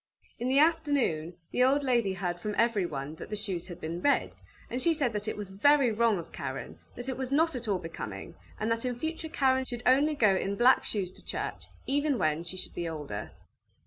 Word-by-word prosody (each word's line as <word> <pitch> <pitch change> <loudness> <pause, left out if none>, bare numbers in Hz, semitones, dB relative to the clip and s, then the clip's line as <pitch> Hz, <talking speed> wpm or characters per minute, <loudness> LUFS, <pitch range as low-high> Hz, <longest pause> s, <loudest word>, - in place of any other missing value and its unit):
In 245 +2 -1
the 265 - +3
afternoon, 285 - +2 0.2
the 250 - +3
old 275 +3 +4
lady 235 -7 +2
heard 175 -2 -3
from 210 +3 -3
everyone 175 -11 0
that - - -8
the 210 - -2
shoes 195 -5 -3
had 175 -3 -8
been 165 +2 -4
red, 285 - +2 0.3
and 250 - -3
she 335 +2 +3
said 270 -6 0
that 210 +1 -3
it 215 - -2
was 205 -2 -6
very 265 +5 +4
wrong 225 -1 +3
of 170 - -7
Karen, 130 -2 -6 0.2
that 245 +1 -5
it 260 - -2
was 260 -1 -3
not 320 +2 +3
at 245 -2 -4
all 200 -3 +2
becoming, 165 - -7 0.3
and 220 +2 0
that 230 0 0
in 250 -1 -2
future 320 +3 -4
Karen 260 -3 +2
should 240 -1 -6
only 285 +4 +4
go 215 -8 +4
in 195 +1 -1
black 245 +5 +5
shoes 190 -4 -1
to - - -12
church, - - -4 0.2
even 285 0 +1
when 155 -3 +1
she 185 +2 -6
should 185 - -5
be 170 -1 -3
older. 145 -10 -5
230 Hz, 220 wpm, -29 LUFS, 175-265 Hz, 0.3 s, black